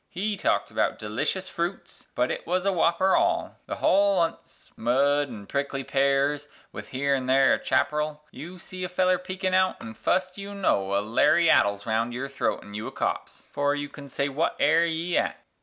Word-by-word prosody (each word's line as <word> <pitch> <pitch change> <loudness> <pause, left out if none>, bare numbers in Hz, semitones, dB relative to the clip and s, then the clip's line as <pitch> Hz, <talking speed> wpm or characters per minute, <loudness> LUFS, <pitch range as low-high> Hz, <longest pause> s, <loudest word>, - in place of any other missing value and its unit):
He 205 +4 -2
talked - - 0
about - - 0
delishes 145 - -2
froots, 175 +2 -5
but 125 +1 +1
then - - -1
it - - -19
was 180 +2 0
a 200 - +3
wopper 175 +1 +3
all, 345 +1 0
The - - -3
holl 200 0 +3
on't 165 -2 -1
's - - -15
mud 140 +5 +2
an' 110 -6 -9
prickly 140 +2 -2
pears, 140 +2 +1 0.2
with - - -8
here 140 +2 0
an' 130 -2 -1
there 135 +1 +5
a - - 0
chapparal; 150 +3 0
You 175 +4 -9
see 185 0 -8
a 180 - -2
feller 185 0 +2
peekin' 185 0 -3
out, 185 0 +2
an', 110 - -8
fust 185 - -1
you 200 0 -7
know, 100 - +1
a - - +1
lariat 155 +5 +4
Is 100 0 -5
round 115 +2 -1
your 135 +2 -4
throat 140 - -2
an' 105 - -12
you 105 +1 -5
a - - -6
copse, - - -3
'fore 145 0 +1
you 145 0 -4
can 145 -1 -11
say, 140 +2 -1
"Wut 145 +4 -1
air 165 +3 +4
ye 170 +2 -1
at?" - - -2
145 Hz, 205 wpm, -26 LUFS, 135-185 Hz, 0.2 s, there